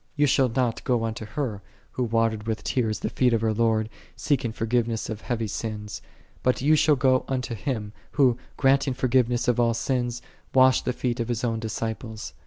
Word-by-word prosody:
4 145 Hz, -, +3 dB
Thou -, -, +7 dB
shalt 130 Hz, -3 st, +2 dB
not 125 Hz, -3 st, 0 dB
go 120 Hz, -3 st, +1 dB
unto 110 Hz, 0 st, -4 dB
her, 105 Hz, -2 st, -3 dB, 0.3 s
who 125 Hz, -, -2 dB
watered 115 Hz, -2 st, 0 dB
with 110 Hz, -1 st, -2 dB
tears 110 Hz, -4 st, -1 dB
the -, -, -1 dB
feet 125 Hz, -2 st, +2 dB
of 115 Hz, -, +2 dB
her 110 Hz, -1 st, +1 dB
Lord, 110 Hz, -1 st, +1 dB, 0.3 s
seeking 130 Hz, -6 st, 0 dB
forgiveness 115 Hz, 0 st, -1 dB
of 110 Hz, 0 st, -6 dB
heavy 115 Hz, -2 st, -2 dB
sins; 105 Hz, -1 st, -5 dB, 0.4 s
but 125 Hz, -, +2 dB
thou 145 Hz, +4 st, +2 dB
shalt 150 Hz, -1 st, +4 dB
go 130 Hz, 0 st, +3 dB
unto 125 Hz, -3 st, -2 dB
Him, 110 Hz, -2 st, -3 dB, 0.2 s
Who, 130 Hz, -5 st, +4 dB, 0.2 s
granting 135 Hz, -1 st, +3 dB
forgiveness 125 Hz, -2 st, +1 dB
of 125 Hz, -1 st, +2 dB
all 115 Hz, -1 st, +3 dB
sins, 120 Hz, 0 st, -1 dB, 0.3 s
washed 130 Hz, 0 st, +5 dB
the -, -, +1 dB
feet 125 Hz, -1 st, -2 dB
of 115 Hz, -, -1 dB
His 120 Hz, -1 st, -2 dB
own 115 Hz, -2 st, 0 dB
disci 110 Hz, 0 st, -3 dB
ples. 110 Hz, -, -8 dB
120 Hz, 195 wpm, -25 LUFS, 110-130 Hz, 0.4 s, Thou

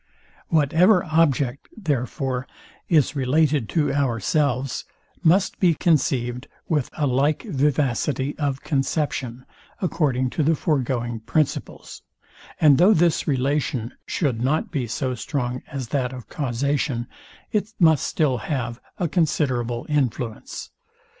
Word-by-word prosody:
Whatever 165 Hz, +6 st, +4 dB
object, 145 Hz, -6 st, +1 dB
therefore, 130 Hz, -, -2 dB, 0.4 s
is 150 Hz, -3 st, +3 dB
related 140 Hz, -2 st, +2 dB
to 150 Hz, -4 st, +1 dB
ourselves 135 Hz, 0 st, 0 dB, 0.4 s
must 185 Hz, +4 st, +3 dB
be 175 Hz, -4 st, +4 dB
conceived 135 Hz, -7 st, +1 dB, 0.2 s
with 150 Hz, -6 st, 0 dB
a 150 Hz, -, +1 dB
little 145 Hz, -, +1 dB
vivacity 140 Hz, -1 st, 0 dB
of 140 Hz, -3 st, -1 dB
conception, 135 Hz, -4 st, -2 dB, 0.3 s
according 135 Hz, -8 st, 0 dB
to -, -, -1 dB
the 160 Hz, +2 st, +3 dB
foregoing 125 Hz, -6 st, -1 dB
principles; 130 Hz, +7 st, -2 dB, 0.6 s
and 150 Hz, -3 st, +6 dB
though 195 Hz, +5 st, +6 dB
this 170 Hz, 0 st, +2 dB
relation 135 Hz, -3 st, 0 dB
should 130 Hz, -9 st, -1 dB
not 150 Hz, +5 st, 0 dB
be 135 Hz, -7 st, -2 dB
so 130 Hz, +3 st, -2 dB
strong 125 Hz, 0 st, -3 dB
as 130 Hz, -4 st, -5 dB
that 130 Hz, -2 st, -1 dB
of 125 Hz, -3 st, -9 dB
causation, 140 Hz, -2 st, -1 dB, 0.5 s
it 210 Hz, 0 st, -1 dB
must 160 Hz, -5 st, +5 dB
still 135 Hz, -6 st, +1 dB
have 120 Hz, -2 st, -3 dB, 0.2 s
a 175 Hz, -, 0 dB
considerable 130 Hz, -8 st, 0 dB
influence. 125 Hz, -6 st, -2 dB
140 Hz, 115 wpm, -23 LUFS, 125-155 Hz, 0.6 s, and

